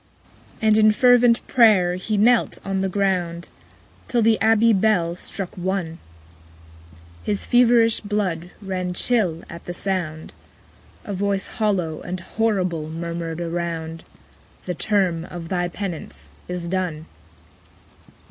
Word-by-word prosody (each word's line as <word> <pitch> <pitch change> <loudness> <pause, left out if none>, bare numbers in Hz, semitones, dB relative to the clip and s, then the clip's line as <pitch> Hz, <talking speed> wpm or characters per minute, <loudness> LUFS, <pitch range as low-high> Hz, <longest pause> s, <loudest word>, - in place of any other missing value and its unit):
8. - - +1
And 215 0 +5
in 215 0 +6
fervent 245 0 +4
pray'r 210 -8 +4
he 205 +4 -2
knelt 235 +3 +3
on 195 -1 -1
the 190 0 0
ground, 180 -3 -1 0.6
Till 240 -2 +1
the 220 0 +3
abbey 225 +1 +4
bell 190 -4 +2
struck 185 +1 -6
One: 180 -3 -3 1.2
His 205 -1 -2
feverish 235 -2 +4
blood 190 -5 -2
ran 185 -2 -3
chill 180 -8 0
at 170 0 -10
the 175 - -6
sound: 170 -5 -3 0.7
A 205 - -4
voice 195 0 -1
hollow 190 -8 -1
and 180 +1 -5
horrible 180 -6 -1
murmured 170 0 -4
around 165 -1 -4 0.6
_45 - - -25
'The 180 - -2
term 180 -3 0
of 170 -2 -8
thy 175 -2 0
penance 175 -2 -7 0.2
is 180 -1 -4
done!' 175 -4 -2
185 Hz, 130 wpm, -22 LUFS, 170-215 Hz, 1.2 s, in